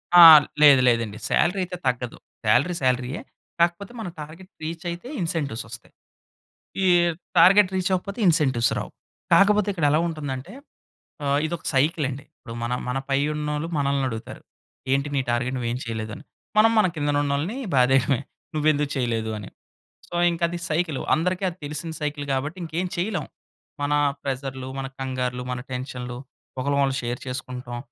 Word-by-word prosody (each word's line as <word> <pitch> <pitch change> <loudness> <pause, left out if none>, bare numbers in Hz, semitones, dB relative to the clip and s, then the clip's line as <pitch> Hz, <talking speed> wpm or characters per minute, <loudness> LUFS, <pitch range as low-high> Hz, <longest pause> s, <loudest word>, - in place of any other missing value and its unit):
ఆ! 175 - +11 0.4
లేదు. 140 -3 +8
లేదండి. 115 -3 0
సాలరీ 180 +3 +2
అయితే 180 0 -5
తగ్గదు. 125 -1 -2 0.3
సాలరీ 135 +12 +3
సాలరీయే. 125 +2 0 0.4
కాకపోతే 170 +4 +1
మన 215 - -4
టార్గెట్ 165 +6 -10
రీచ్ 165 +2 -5
అయితే 175 +8 -6
ఇన్సెంటివ్స్ 155 -8 -2
వస్తాయి. 110 -1 -11 0.9
ఈ - - +4 0.5
టార్గెట్ 190 +3 +7
రీచ్ 185 -1 0
అవ్వకపోతే 200 +4 -2
ఇన్సెంటివ్స్ 135 -9 +3
రావు. - - -5 0.4
కాకపోతే 205 +1 +5
ఇక్కడ 165 -6 +1
ఎలా 155 - +4
ఉంటుందంటే 145 0 -5 0.7
ఆహ్, 140 0 +2
ఇదొక 170 +1 -5
సైకిల్ 150 +3 +2
అండి. 135 +1 -6
ఇప్పుడు 115 - -9
మన, 120 +1 -2 0.2
మన 125 +2 -1
పై 135 - +2 0.2
ఉన్నోళ్ళు 150 +1 -2
మనల్ని 140 -1 +1
అడుగుతారు, 115 -2 -7 0.5
"ఏంటి 140 +2 +1
నీ 135 - +2
టార్గెట్ 120 +2 0
నువ్వు 120 -2 -2
ఏమి 125 +2 -3
చేయలేదు" 110 -1 -4
అని. - - -12 0.3
మనం 220 +1 +6
మన 210 - +5
కింద 145 -1 -1
ఉన్నోళ్ళని 145 - -1 0.2
బాధేయడమే. 130 0 +4 0.4
నువ్వెందుకు 150 -1 +1
చేయలేదు 115 -4 -1
అని. 100 -3 -8 0.6
సో, - - -11 0.2
ఇంక 170 - -4
అది 175 0 -4
సైకిలు, 155 -2 -1
అందరికి 180 +4 -1
అది 175 - -7
తెలిసిన 150 +3 -4
సైకిల్ 150 -1 -3
కాబట్టి, 145 +6 -2
ఇంకేం 170 +3 -2
చేయలేం. 175 -2 -2 0.6
మన 145 - 0 0.3
ప్రెసర్‌లు, 130 -1 -4
మన 135 - -3
కంగారులు, 125 -1 -3
మన 125 0 -3
టెన్షన్‌లు, 125 -1 -5 0.4
ఒకలకొకళ్ళం 140 0 +1
షేర్ 120 0 -3
చేసుకుంటాం. 125 -1 -5
140 Hz, 155 wpm, -24 LUFS, 125-170 Hz, 0.9 s, ఆ